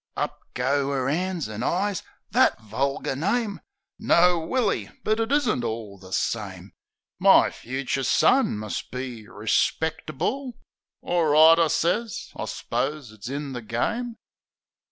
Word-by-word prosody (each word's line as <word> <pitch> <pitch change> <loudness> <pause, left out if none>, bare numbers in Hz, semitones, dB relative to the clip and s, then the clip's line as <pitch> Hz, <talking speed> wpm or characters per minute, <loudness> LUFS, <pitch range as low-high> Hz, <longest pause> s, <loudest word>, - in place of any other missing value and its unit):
Up - - -2 0.2
goes 135 +3 +1
'er 135 -2 0
'ands 175 +1 -1
an' 110 +1 -6
eyes, 190 +7 0 0.3
"That - - +4
vulgar 130 +6 -2
name! 205 - -1 0.4
No, 175 0 +4
Willy, 205 +7 0
but 215 +1 +1
it 225 +3 -1
isn't 250 - +2
all 110 -4 -5
the 95 -1 -13
same, 95 -3 -3 0.5
My - - +6
fucher 135 +2 -3
son 255 - +3
must 105 -1 -5
be 125 -4 -6
respectable." 160 - -1 0.5
"Orright," 160 -1 +5
I 165 - +4
sez, 190 +9 -1
"I - - -4
s'pose 145 -4 -3
it's 110 +2 -9
in 140 0 -4
the 120 - -5
game." 225 - -2
145 Hz, 130 wpm, -25 LUFS, 120-185 Hz, 0.5 s, My